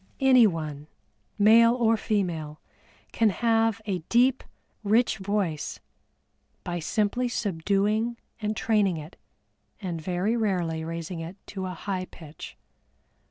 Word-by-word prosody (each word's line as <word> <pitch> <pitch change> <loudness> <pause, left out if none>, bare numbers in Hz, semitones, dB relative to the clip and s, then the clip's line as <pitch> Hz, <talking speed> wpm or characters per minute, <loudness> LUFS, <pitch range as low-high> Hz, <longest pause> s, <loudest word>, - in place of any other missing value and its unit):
Anyone, 165 - +3 0.5
male 230 +3 +6
or 230 -2 +3
female, 170 -8 -2 0.5
can 225 -2 +3
have 225 +2 +1
a 195 -3 -1
deep, 250 +2 +3 0.4
rich 220 +1 +2
voice 190 -6 -2 0.8
by 175 0 -3
simply 215 +8 0
subduing 210 +4 0 0.2
and 215 0 -2
training 205 -6 +2
it, 155 +3 -9 0.6
and 175 -5 -4
very 180 +7 0
rarely 180 -8 -1
raising 165 +1 -5
it 165 +3 -7
to 190 -2 -4
a 180 - -5
high 185 +1 -3
pitch. 160 -4 -11
200 Hz, 115 wpm, -26 LUFS, 170-225 Hz, 0.8 s, male